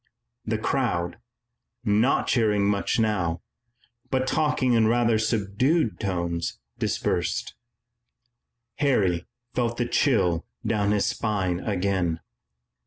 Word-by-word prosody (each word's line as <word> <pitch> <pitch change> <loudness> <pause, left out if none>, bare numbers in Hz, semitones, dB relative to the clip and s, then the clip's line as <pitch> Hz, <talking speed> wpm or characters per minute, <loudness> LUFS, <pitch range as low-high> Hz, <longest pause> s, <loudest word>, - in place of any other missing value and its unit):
The - - 0
crowd, 85 0 -1 0.7
not 110 +6 +3
cheering 105 -4 +2
much 100 -1 +1
now, 90 -7 0 0.7
but 130 -1 +1
talking 145 -3 +1
in 115 -2 +4
rather 115 -1 +3
subdued 110 - +1
tones, 85 -4 -2 0.2
dispersed. - - -1 1.2
Harry 95 -12 +1 0.3
felt 120 -1 -1
the 120 - 0
chill 90 - +2 0.2
down 105 -2 +1
his 105 -1 +2
spine 95 -5 -1
again. 95 -4 0
105 Hz, 100 wpm, -25 LUFS, 90-120 Hz, 1.2 s, in